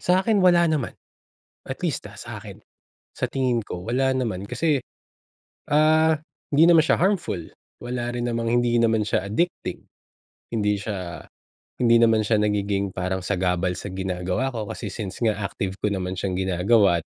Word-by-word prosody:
Sakin 190 +4 +2
wala 175 -2 +5
naman. 155 -7 -1 0.7
At - - -6
least, - - -2
ah, - - -13
sa'kin. - - -9 0.5
Sa - - -2
tingin 125 -4 0
ko 90 -1 -7
wala 130 +3 +1
naman 115 -8 -1
kasi, 150 -6 +1 0.9
ah, 155 +2 +4 0.3
hindi 150 +3 +5
naman 170 -1 +7
siya 155 - +3
harmful, 180 - 0 0.4
wala 120 -1 -3
rin 120 - -2
namang 115 -1 -1
hindi 120 -1 +2
naman 110 -2 +2
siya 100 -1 -1
addicting, 170 - -2 0.7
hindi 105 -3 +1
siya 95 -6 -5 0.5
hindi 115 -1 +4
naman 110 -2 +4
siya 105 0 +2
nagiging 100 -1 0
parang 95 0 -3
sagabal 90 -1 0
sa 95 -1 -6
ginagawa 95 +6 -2
ko 115 -4 -4
kasi 105 +1 -6
since 100 +2 -6
nga 110 -3 +2
active 95 -1 -4
ko 105 -1 -1
naman 95 -1 -3
siyang 95 -2 -2
ginagawa't, 95 -1 +2
110 Hz, 155 wpm, -24 LUFS, 95-130 Hz, 0.9 s, naman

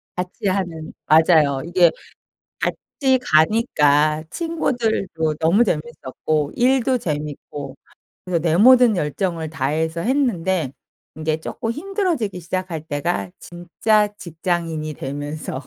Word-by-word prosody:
같이 180 +2 -4
하는 175 -5 -2
맞아요. 155 -3 +4
이게 175 -1 +4 0.7
같이 265 -3 0
가니까 155 - +3
친구들도 225 - -1
너무 175 +9 +4
재밌었고 155 - -2
일도 255 0 +2
재밌고 145 - -5 0.5
그래서 180 -2 0
내 160 -1 +1
모든 245 +1 +6
열정을 165 0 -2
다해서 160 +3 -1
했는데 190 - 0 0.5
이제 155 0 0
쪼끔 225 +7 -4
힘들어지기 325 - -2
시작할 180 -1 -4
때가 170 +5 -2
진짜 210 +5 0
직장인이 165 -3 -3
되면서 145 0 -5
170 Hz, 255 characters per minute, -21 LUFS, 155-215 Hz, 0.7 s, 모든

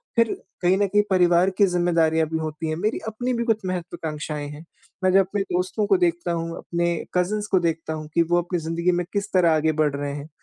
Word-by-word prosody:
फिर 230 -1 +3 0.3
कहीं 180 +2 +3
न 200 0 +2
कहीं 205 +2 +3
परिवार 180 0 +4
की 200 - +6
ज़िम्मेदारियाँ 165 -3 +2
भी 160 - -1
होती 155 0 -4
हैं, 155 - -1
मेरी 215 +5 0
अपनी 245 +3 -2
भी 235 0 -1
कुछ 225 -2 +2
महत्वाकांक्षाएँ 155 -4 -4
हैं। 150 +3 -10 0.4
मैं 185 - +4
जब 195 - +7
अपने 200 +1 -2
दोस्तों 185 +2 -1
को 195 - +4
देखता 175 -1 0
हूँ, 165 0 -3
अपने 170 0 -2 0.3
कज़िन्स 205 +4 0
को 190 - +5
देखता 165 -2 -2
हूँ 155 -1 -6
कि 170 - +3
वो 175 - +5
अपनी 175 0 -3
ज़िंदगी 165 +2 0
में 175 -1 -1
किस 200 0 -1
तरह 175 -3 +4
आगे 155 +1 +2
बढ़ 150 -2 +2
रहे 140 0 -3
हैं। 145 +1 -8
175 Hz, 225 wpm, -23 LUFS, 160-190 Hz, 0.4 s, जब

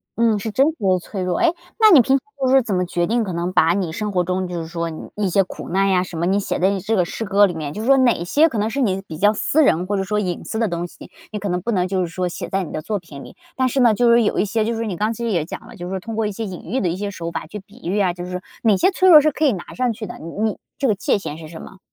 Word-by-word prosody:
嗯， 225 -2 +2
是 220 +2 -4
真 270 +6 +3
实 320 - 0
的 185 -3 +2
脆 190 +2 -6
弱。 180 -1 -1
诶， 345 -1 +3 0.3
那 435 -1 +7
你 305 -8 +9
平 265 +3 +3
常 - - -5 0.2
就 265 - +1
是 255 - +3
说 270 - +6
怎 220 -5 -2
么 180 0 +1
决 175 0 -1
定， 235 +1 +1
可 190 -4 -4
能 170 +2 -2
把 170 -2 +4
你 180 -3 -1
生 210 +4 -3
活 180 -2 +1
中 185 +1 -2
就 175 -1 -4
是 160 - -7
说 170 0 -3
你 160 - -8
一 205 -2 0
些 195 +2 +3
苦 185 - -9
难 195 +2 +2
呀 185 -1 +3
什 180 -2 -8
么， 170 - 0
你 195 +3 +2
写 200 - -2
在 185 +2 +3
你 200 -1 -1
这 215 +4 -1
个 185 - +3
诗 225 - -5
歌 200 +1 +5
里 185 - -2
面， 150 -3 -5
就 210 - -5
是 225 - -4
说 275 0 +6
哪 240 -9 +3
些 295 - +4
可 235 - -4
能 210 +1 0
是 240 - -3
你 195 -6 0
比 155 - -7
较 205 +5 +4
私 305 +8 +2
人， 180 - +2
或 205 +1 0
者 195 - 0
说 210 +2 -1
隐 180 -4 -3
私 220 - -3
的 225 - +2
东 175 -2 -3
西， - - -14 0.2
你 210 - -4
可 205 - -3
能 180 0 -1
不 235 - -2
能 185 -4 +1
就 190 0 -1
是 180 - -1
说 180 +2 -3
写 - - -6
在 195 0 0
你 170 - -8
的 155 - -4
作 210 +4 -3
品 150 -6 -11
里？ - - -13 0.2
但 260 0 +2
是 260 +2 -1
呢， 235 -3 +5
就 235 +2 +3
是 235 0 +5
有 210 - 0
一 - - +2
些 215 +2 0
就 230 +1 -1
是 225 0 -2
你 200 -5 -3
刚 210 +5 0
才 - - -2
其 235 - -5
实 230 - -1
也 170 -6 +1
讲 - - -8
了， - - -12
就 175 0 -7
是 190 0 -3
通 225 +4 -7
过 220 0 0
一 - - -3
些 220 +3 -5
隐 185 -4 -7
喻 260 - +1
的 185 - 0
一 170 - -1
些 200 +2 -3
手 170 -4 -5
法， 165 - -5
去 210 +6 -7
比 205 +5 -19
喻 200 +3 0
啊， 185 -3 +2
就 175 0 -7
是 180 0 -5 0.2
哪 215 -4 +4
些 375 - +3
脆 375 0 +3
弱 315 -4 +10
是 305 +1 +2
可 300 - -3
以 280 - +4
拿 180 - -8
上 250 -1 0
去 215 0 -7
的， - - -8
你 165 - -8
你 220 -1 0 0.2
这 275 - 0
个 215 - +2
界 205 - +1
限 155 -6 -6
是 160 -1 -9
什 160 - -9
么？ 190 - -12
200 Hz, 385 characters per minute, -21 LUFS, 180-225 Hz, 0.3 s, 弱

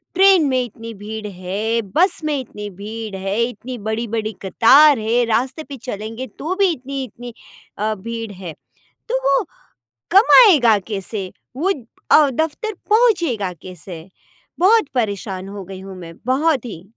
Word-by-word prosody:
Train 380 -4 +6
में 255 -1 +2
इतनी 230 0 -9
भीड़ 210 +1 -6
है, 200 +5 -2
बस 360 +3 +3
में 295 -3 0
इतनी 210 -4 -7
भीड़ 210 +2 -7
है, 195 +4 -2
इतनी 245 +1 -5
बड़ी-बड़ी 220 0 -2
कतार 265 +7 +6
है, 230 +3 +1
रास्ते 255 +7 -1
पे 275 - -7
चलेंगे 225 +4 -5
तो 325 +6 -2
भी 395 -1 +3
इतनी-इतनी 255 -4 -6 0.5
अ, 215 +1 0
भीड़ 230 +1 -6
है। 180 -4 -8 0.6
तो - - +1
वो 275 +7 +3 0.7
कमाएगा 365 - +7
कैसे? 195 -1 -4 0.2
वो 360 +7 0 0.4
अ, 295 -3 +6
दफ़्तर 320 - -2 0.2
पहुँचेगा 345 - +2
कैसे? 175 -1 -10 0.5
बहुत 410 -3 +4
परेशान 200 -4 -2
हो 200 -1 -7
गई 190 0 -9
हूँ 190 -1 -9
मैं, 165 -1 -10
बहुत 270 0 +1
ही। 175 -7 -8
230 Hz, 140 wpm, -20 LUFS, 200-285 Hz, 0.7 s, कमाएगा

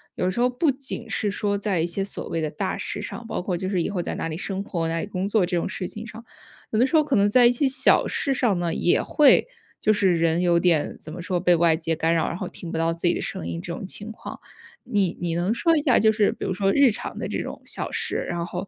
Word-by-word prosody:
有 180 - 0
时 185 - -3
候 250 - +4
不 270 +6 +1
仅 260 -4 -4
是 205 -2 0
说 205 0 -1
在 200 -3 -1
一 165 - +1
些 195 +3 -2
所 200 - -6
谓 165 - -2
的 155 -1 -2
大 190 +5 -3
事 205 - -4
上， 220 +3 -7
包 220 - -3
括 180 0 -2
就 185 +2 -3
是 185 -3 0
以 - - -1
后 195 -3 -2
在 - - -4
哪 - - -3
里 160 - -4
生 195 +1 -3
活， 170 -5 -2
哪 165 0 -1
里 - - -5
工 190 -2 -3
作 205 -3 +2
这 180 0 -2
种 170 - -1
事 185 -3 -4
情 215 +1 -7
上， 230 0 -11 0.5
有 215 - +1
的 245 - +5
时 325 - -1
候 305 - +5
可 285 -3 0
能 205 0 +4
在 245 +3 +5
一 - - +5
些 275 +3 +1
小 260 - +3
事 275 - 0
上 220 -9 +1
呢， 170 -1 -1
也 175 - +2
会 300 - +4 0.3
就 215 - +4
是 190 -4 +2
人 165 +1 +2
有 175 -1 +3
点 170 -4 +1
怎 155 - -9
么 175 - -7
说， 180 0 -1
被 175 -1 +4
外 165 -1 +3
界 165 -1 -2
干 165 +1 +1
扰， 165 - +1
然 - - -3
后 - - -4
听 170 - -9
不 - - -3
到 165 0 +1
自 170 +1 -1
己 175 - +3
的 - - -3
声 80 - -4
音 85 0 -4
这 170 - -6
种 185 - -6
情 210 +3 -5
况。 220 - -9 0.5
你 200 -7 0
你 170 -1 -1
能 175 +5 0
说 330 +7 +3
一 - - +1
下， 260 -4 +3
就 220 0 +5
是 210 -2 +2
比 - - -6
如 190 - -1
说 195 +1 +1
日 280 -4 +5
常 230 +4 -6
的 - - -3
这 - - -2
种 - - -7
小 - - -1
事， - - -1
然 170 -1 -2
后 180 +2 -5
190 Hz, 315 characters per minute, -24 LUFS, 170-220 Hz, 0.5 s, 的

